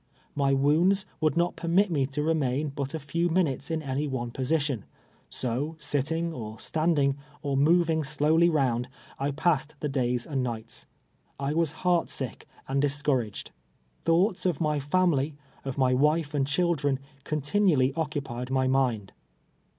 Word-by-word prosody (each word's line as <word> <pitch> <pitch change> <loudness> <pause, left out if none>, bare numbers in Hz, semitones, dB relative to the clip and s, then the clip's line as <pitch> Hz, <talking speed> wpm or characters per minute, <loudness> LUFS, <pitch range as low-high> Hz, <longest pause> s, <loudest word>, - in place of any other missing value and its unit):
My 140 -1 +1
woinids 170 +8 +3
would 155 +1 +1
not 175 +1 +1
perinit 180 +3 +2
mo 140 -4 +2
to 140 +2 -3
re 160 +1 +2
main 145 0 0
but 140 +1 -4
a - - -3
few 170 +4 -1
minutes 160 -6 0
in 160 -1 -2
any 140 +2 -1
one 120 -3 -3
position; 135 -3 0 0.5
so, 130 +6 -2
sit 145 -3 -1
ting, 165 +2 -1
or 110 -5 -6
shmding, 150 -3 +1 0.3
or 140 -2 -1
moving 160 +2 +3
slowly 155 +3 +3
round, 130 -6 +1 0.3
I 140 +1 0
passed 150 0 0
tlie 150 - -2
days 125 -2 0
and 140 -4 -1
nights. 115 -3 -4 0.5
I 140 +1 -1
was 165 -2 +1
heart 175 -2 +3
sick 130 -5 -4 0.2
and 135 +1 +1
discour 145 -2 +1
aged. 105 -2 -8 0.5
Thoughts 180 +3 +2
of 175 -5 0
my 150 -2 +1
family, 150 -1 +1 0.3
of 135 -1 -5
my 130 -2 +3
v, 135 +4 +5
ife 155 -1 -1
and 140 -2 +1
chil 170 +5 +2
dren, 145 -3 0 0.3
continually 150 -2 +2
occupied 140 -6 -3
my 130 0 +1
mind. 125 -6 +1
145 Hz, 165 wpm, -27 LUFS, 135-160 Hz, 0.5 s, v